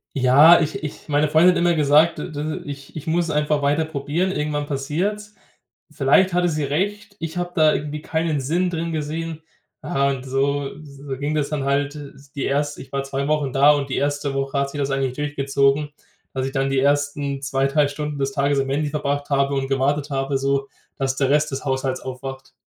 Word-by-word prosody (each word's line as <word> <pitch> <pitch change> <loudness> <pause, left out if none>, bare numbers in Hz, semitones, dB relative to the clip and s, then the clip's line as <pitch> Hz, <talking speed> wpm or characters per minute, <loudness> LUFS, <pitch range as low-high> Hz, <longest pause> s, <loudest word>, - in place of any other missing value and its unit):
Ja, 140 +6 +7
ich 170 +5 -2
ich 150 - -7
meine 150 0 +2
Freundin 160 +4 +6
hat - - 0
immer 175 0 +3
gesagt, 150 +2 +4
de - - -5
de 150 +1 -4
ich 140 -2 -9
ich 155 - -6
muss 165 +1 0
einfach 150 -1 +1
weiter 145 +3 +2
probieren, 155 +5 -1
irgendwann 150 -3 -2
passiert's. 180 +10 -3 0.6
Vielleicht 155 +6 +3
hatte 175 0 +2
sie 155 -2 -1
recht. 200 +8 -2
Ich 165 +1 -5
habe 175 0 -2
da 155 -3 +5
irgendwie 150 +1 -4
keinen 160 -1 -1
Sinn 170 +7 0
drin 165 -1 -3
gesehen. 160 +1 -4 0.4
Ja, 140 -5 +1
und 135 -1 -3
so 135 +1 0
so 140 -1 -7
ging 145 +2 -1
das 145 -2 0
dann 150 -2 -2
halt 140 +1 0
s 140 -1 -11
die 140 -3 -4
1. 145 +1 -1
ich 130 - -13
war 140 0 -1
2 135 0 -3
Wochen 150 -4 0
da 140 +2 +5
und 145 -2 0
die - - -1
1. 145 0 -1
Woche 135 +1 -2
hat 140 0 0
sich 145 - -6
das 140 -1 0
eigentlich 135 -2 -1
durchgezogen, 140 0 +1 0.4
dass 130 -1 -2
ich - - -5
dann 135 -1 0
die 135 - +2
ersten 145 0 0
2, 135 0 +1
3 145 +1 +2
Stunden 150 +1 -4
des 135 0 -1
Tages 140 0 +1
am 135 0 -1
Handy 145 +2 0
verbracht 145 -1 -2
habe 140 0 +2
und 135 -1 -1
gewartet 140 +2 0
habe, 135 0 -1
so, 140 0 0 0.3
dass 135 0 -1
der 135 -2 +1
Rest 150 +2 +2
des 135 +2 -5
Haushalts 130 -1 -1
aufwacht. 130 -1 -7
145 Hz, 210 wpm, -22 LUFS, 135-155 Hz, 0.6 s, Ja